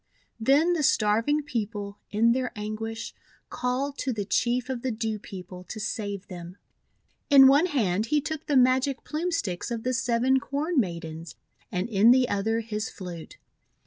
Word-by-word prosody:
Then 285 +9 +4
the 335 - 0
starving 230 +4 +2
people, 210 -6 -4
in 225 +3 +3
their 255 0 0
anguish, 215 +2 -5 0.4
called 260 +3 -2
to 265 - -1
the 210 -4 -3
Chief 240 +4 0
of 260 -3 -4
the 260 - -1
Dew 220 -2 -2
People 180 -3 -9
to 215 - -7
save 205 -2 -4
them. 175 0 -9 0.7
In 275 -2 +9
one 285 +6 +6
hand 215 - 0
he 300 +5 +2
took 310 +1 -5
the 285 - +3
Magic 255 +2 +3
Plume 330 +4 -2
Sticks 185 - -2
of 230 -2 -4
the 255 - 0
Seven 255 +1 +2
Corn 290 +4 -1
Maidens, 170 -5 -4 0.4
and 180 +3 -1
in 220 0 +4
the 250 0 +5
other 225 +3 0
his 215 -1 -4
flute. 175 -4 -9
230 Hz, 165 wpm, -26 LUFS, 205-265 Hz, 0.7 s, In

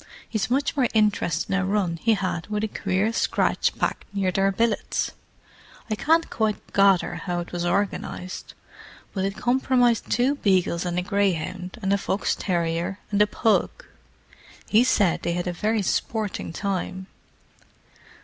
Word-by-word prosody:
He's 220 0 -2
much 275 +3 +1
more 260 -4 +3
interested 200 -5 +1
in 195 - +2
a - - 0
run 190 -3 0
he 225 +6 +2
had 185 -4 -3
with 210 0 -2
a - - +1
queer 200 +2 -1
scratch - - +1
pack - - -1
near 195 -2 0
their 195 +2 +2
billets. 225 +2 0 0.8
I - - +2
can't 325 +8 +2
quite 220 -2 -2
gather 195 -2 +4
how 175 -2 -2
it 170 - -9
was 175 -1 -2
organized, 185 0 -2 0.6
but 190 -2 -1
it 195 0 -2
comprised 245 -2 +2
two 260 +4 +2
beagles 185 -5 +1
and 175 0 -2
a 180 - +1
greyhound 185 -1 -1
and 195 +1 +2
a 200 - +2
fox 195 +1 0
terrier 170 +1 -1
and 205 0 +2
a 210 - +5
pug. 220 +1 +2 1.0
He 220 +3 +5
said 205 -8 +2
they 170 - -1
had 175 0 -2
a 180 - -2
very 215 +3 0
sporting 215 -1 -2
time!" 190 0 -3
195 Hz, 160 wpm, -24 LUFS, 180-220 Hz, 1.0 s, a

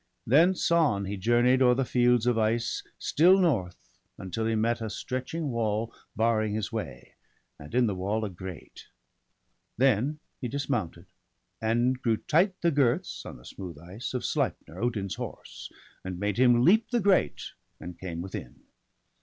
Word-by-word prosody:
Thence 170 +9 +3
on 130 -13 +3
he 100 +2 -3
journey'd 120 +6 +3
o'er 125 -1 +5
the 135 0 0
fields 125 -1 +3
of 125 -1 +3
ice 115 +1 0 0.2
Still 180 +5 +4
north, 115 - -1 0.3
until 105 +4 -3
he 115 - +1
met 115 +2 0
a 110 - -3
stretching 130 +7 -4
wall 110 -1 -1 0.2
Barring 110 -2 +1
his 110 -2 -3
way, - - -6 0.5
and 75 +10 -9
in 125 -1 +4
the 105 - 0
wall 100 +4 -2
a - - -4
grate. 95 -2 -10 0.9
Then 130 +3 +2 0.2
he 125 - -3
dismounted, 120 - -3 0.6
and 120 +3 +1
drew 115 -4 +1
tight 185 - +1
the 170 - +3
girths, 145 +4 0
On - - -8
the - - -17
smooth 90 -5 -8
ice, 95 - -7
of 125 - -2
Sleipner, 80 +3 -2
Odin's 110 -5 -1
horse. - - -8 0.3
And 95 -1 -5
made 105 +2 -1
him 120 -1 +5
leap 215 +7 +4
the 245 - +1
grate, 200 -3 +1 0.3
and 90 0 -9
came 85 -2 -5
within. 95 - -8
115 Hz, 160 wpm, -28 LUFS, 100-130 Hz, 0.9 s, o'er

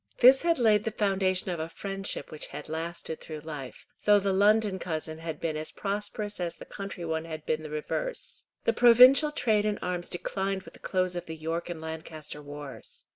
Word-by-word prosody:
This 260 +2 +8
had 335 -1 +2
laid 215 -4 +4
the 225 - 0
foundation 190 -3 +1
of 175 - -3
a 160 +1 -3
friendship 195 +2 -4
which 155 - -4
had 145 +1 -8
lasted 160 0 -4
through 155 -2 -7
life, 150 -4 -8 0.2
though 210 0 +7
the 200 -1 +1
London 205 0 +4
cousin 160 -2 -4
had 160 -2 -5
been 160 -2 -2
as 155 0 -2
prosperous 205 +1 -3
as 175 -1 -2
the - - -11
country 195 -3 -6
one 160 0 -2
had 155 -2 -7
been 155 0 0
the 155 - -7
reverse. 485 - -4 0.2
The 230 - +2
provincial 250 +6 +8
trade 220 -8 +2
in 210 -1 0
arms 180 -1 -3
declined 190 +2 -2
with - - -13
the - - -15
close 185 -1 0
of 175 0 -5
the 160 0 -6
York 165 +2 -3
and 170 -2 -5
Lancaster 160 -2 -7
wars. 145 -1 -8
180 Hz, 200 wpm, -29 LUFS, 160-210 Hz, 0.2 s, This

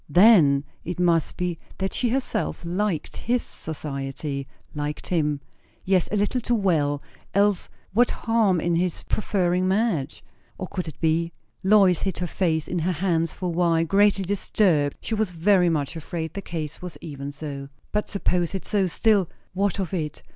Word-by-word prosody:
Then, 165 -6 +6 0.2
it 180 +1 -5
must 170 -3 +2
be 175 -2 -2 0.2
that 190 0 -2
she 245 - +1
herself 240 -7 -1
liked 180 -2 -1
his 245 +1 0
society 140 -2 -5 0.3
liked 150 0 -4
him 150 -5 +1 0.4
yes, 185 -2 +2
a - - +1
little 210 +5 +1
too 240 +1 +1
well; 155 -9 +1 0.3
else 200 -2 +3 0.2
what 240 +4 +4
harm 225 -6 +2
in 170 +1 0
his 175 0 0
preferring 185 -3 +1
Madge? 190 - 0 0.4
O, 190 - -3
could 180 -2 -4
it 155 - -8
be? 165 +1 +1 0.3
Lois 190 -3 +5
hid 190 -2 -1
her 180 - -2
face 165 -3 0
in 175 - -1
her 180 +3 0
hands 165 -1 0
for 185 - -7
a - - +1
while, 165 -1 +2
greatly 195 +1 +3
disturbed; 180 -6 +1
she - - -4
was 220 -2 +1
very 180 +1 +3
much 150 -1 -1
afraid 160 0 -4
the 200 - -4
case 155 -5 -5
was 180 -2 -7
even 140 -3 -6
so. 140 -2 -6 0.2
But 210 0 -1
suppose 180 -3 0
it 190 - -4
so; 200 -3 +1
still, 200 0 +2 0.2
what 200 +1 0
of 190 -2 -3
it? 155 -5 -3
175 Hz, 170 wpm, -25 LUFS, 160-200 Hz, 0.4 s, Then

